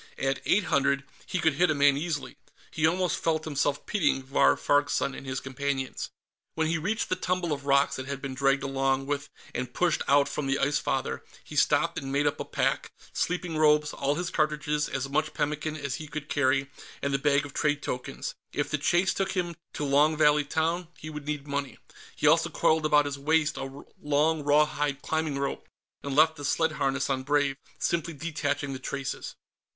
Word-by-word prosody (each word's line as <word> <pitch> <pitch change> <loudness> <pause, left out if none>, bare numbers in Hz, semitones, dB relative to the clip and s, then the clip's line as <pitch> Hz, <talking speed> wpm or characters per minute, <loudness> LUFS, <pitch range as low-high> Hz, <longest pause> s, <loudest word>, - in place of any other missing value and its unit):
At 135 0 -1
eight 210 - +3
hundred, 140 -4 +2 0.2
he - - -2
could 160 -3 +2
hit 175 +5 +3
a 155 - +2
man 140 0 +5
easily. 150 0 -3 0.4
He 155 0 +2
almost 180 +2 0
felt 160 -1 +1
himself 145 -2 -1
pitying 150 -9 +1
Vahr 135 +1 +4
Farg's 145 0 +2
son 140 - 0
and 135 - -9
his 130 0 -2
companions. 135 0 -3 0.5
When 160 - +1
he 165 +1 0
reached 210 +8 -1
the - - +2
tumble 180 -3 -1
of 140 0 -6
rocks 140 0 +3
that 130 0 -6
had 140 -1 -4
been 135 -1 -5
dragged 135 +1 +2
along 135 0 0
with 145 0 -3 0.2
and 125 0 -4
pushed 175 -3 +2
out 140 +1 +5
from 150 - -3
the 135 0 +1
Ice 145 +2 +1
Father, 130 - -2 0.2
he - - -10
stopped - - +2
and 135 -1 -6
made 145 +1 +1
up 145 - 0
a - - -3
pack - - -1 0.2
sleeping 175 -2 -1
robes, 150 -1 +4
all 140 +1 0
his 175 +2 -3
cartridges, 150 -1 0
as 135 0 -2
much 155 +3 -1
pemmican 150 +1 -1
as 140 -3 -3
he 155 - -8
could 150 0 -6
carry, 140 0 +1 0.3
and 140 0 0
the 135 - +2
bag 140 0 +2
of 140 - -10
trade 145 -2 0
tokens. 125 0 -4 0.2
If 145 - -1
the 155 - 0
chase 175 +5 +2
took 195 -1 -1
him 175 -3 -2 0.2
to 145 - -3
Long 145 +3 +4
Valley 150 -1 +4
Town, 165 +4 0
he 155 - -8
would 150 -1 -8
need 150 -2 -3
money. 140 -1 -3 0.4
He - - -3
also - - +5
coiled 155 -1 +2
about 150 -1 +4
his 140 -1 -4
waist 155 +1 +2
a 135 +1 -7 0.2
long 150 +2 +2
rawhide 145 -1 +2
climbing 160 -3 -1
rope, 140 0 -3 0.3
and 140 -1 -4
left 160 +1 +5
the 145 - -8
sled 160 +3 +1
harness 140 -1 0
on 135 -1 0
Brave, 145 0 +1 0.2
simply 170 0 -1
detaching 145 -2 -2
the 130 - -6
traces. 135 +1 -4
145 Hz, 200 wpm, -28 LUFS, 140-155 Hz, 0.5 s, man